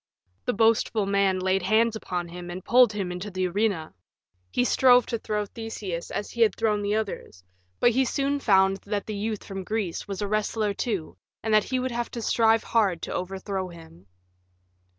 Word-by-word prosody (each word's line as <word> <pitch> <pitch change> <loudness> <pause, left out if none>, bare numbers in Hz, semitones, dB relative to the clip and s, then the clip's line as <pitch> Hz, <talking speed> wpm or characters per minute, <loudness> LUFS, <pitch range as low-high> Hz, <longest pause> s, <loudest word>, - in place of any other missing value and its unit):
The - - +1
boastful 225 -1 +2
man 200 -1 +2
laid 190 +1 +1
hands 220 +4 +2
upon 180 -5 -4
him 175 0 -8
and 180 +1 -7
pulled 245 -2 +6
him 195 -3 -3
into 180 +4 -5
the 185 -1 -1
arena. 185 - -1 0.6
He 245 - +1
strove 250 -1 +5
to 230 - -3
throw 210 -1 -2
Theseus 205 -6 -6
as 205 - -4
he 235 - -4
had 225 - +4
thrown 215 -2 +1
the 205 +1 0
others; 200 - -4 0.4
but 240 - +5
he 260 +3 +2
soon 275 +2 0
found 195 -5 +4
that 205 0 -4
the 215 - -5
youth 210 +1 -3
from 195 -1 -6
Greece 210 -3 -3
was 195 -2 -5
a - - -1
wrestler, 215 0 0
too, 200 -6 -3 0.3
and 220 0 0
that 215 -1 +5
he 260 - -1
would 255 0 -2
have 240 0 -2
to - - -3
strive 225 0 +3
hard 195 -7 +1
to - - -4
overthrow 190 +1 -3
him. 160 - -14
205 Hz, 190 wpm, -26 LUFS, 185-225 Hz, 0.6 s, pulled